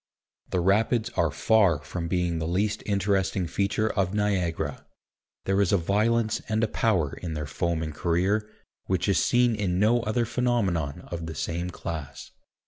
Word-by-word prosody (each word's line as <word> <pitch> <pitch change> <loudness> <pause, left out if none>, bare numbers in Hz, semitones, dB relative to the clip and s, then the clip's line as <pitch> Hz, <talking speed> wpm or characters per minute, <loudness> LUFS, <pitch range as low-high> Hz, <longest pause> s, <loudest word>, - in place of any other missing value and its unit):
The 90 - 0
Rapids 110 +5 +2
are 85 - +1
far 100 +2 +3
from 85 0 -4
being 85 -1 0
the 80 - -2
least 105 +5 0
interesting 100 -2 +1
feature 100 +5 0
of 95 -2 -1
Niagara. 95 -5 -1 0.6
There 95 +1 +2
is 100 - +2
a 100 - +4
violence 110 +5 +1
and 110 +1 +1
a - - +3
power 95 -10 +1
in 85 -3 -4
their 75 0 -3
foaming 80 +2 -2
career, 95 +7 0 0.4
which 95 0 0
is 95 -5 +3
seen 120 -1 +3
in 95 -4 -1
no 110 +5 +3
other 115 +2 0
phenomenon 110 - 0
of 85 -1 -4
the 80 - -6
same 85 +4 -3
class. 80 -5 -7
95 Hz, 160 wpm, -26 LUFS, 85-110 Hz, 0.6 s, a